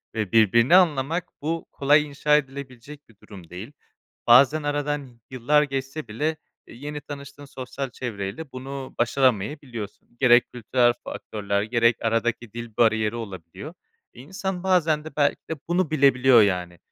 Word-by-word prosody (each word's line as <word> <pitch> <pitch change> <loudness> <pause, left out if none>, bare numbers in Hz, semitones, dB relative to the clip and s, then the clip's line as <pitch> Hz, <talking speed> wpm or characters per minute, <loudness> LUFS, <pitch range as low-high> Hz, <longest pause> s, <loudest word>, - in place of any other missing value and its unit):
ve 110 -4 -2
birbirini 115 - +5
anlamak 165 -2 +2 0.2
bu 165 +3 -3
kolay 145 +2 +3
inşa 150 +1 +2
edilebilecek 140 0 -8
bir 115 - -21
durum 95 -6 -13
değil. 95 +9 -9 0.6
Bazen 140 +6 +6
aradan 145 -1 -2
y 125 - -18 0.2
yıllar 130 +4 +2
geçse 135 +1 -4
bile, 150 +9 -2 0.3
e, - - -14
yeni 145 +4 -7
tanıştığın 140 0 -10
sosyal 135 0 -6
çevreyle 120 +4 -6
bunu 135 +1 -7
başaramayabiliyorsun. 120 -2 -1
Gerek 120 -2 +4
kültürel 120 +1 +2
faktörler 100 -1 -3
gerek 115 +1 +2
aradaki 115 0 -1
dil 120 -2 -8
bariyeri 110 -2 +2
olabiliyor. 95 -8 -8 0.4
İnsan 185 +7 -5
bazen 165 -5 +2
de 160 - -10
belki 145 -1 0
de - - 0
bunu 175 -1 0
bilebiliyor 130 -5 +5
yani. 90 -3 -1
130 Hz, 140 wpm, -24 LUFS, 115-145 Hz, 0.6 s, Bazen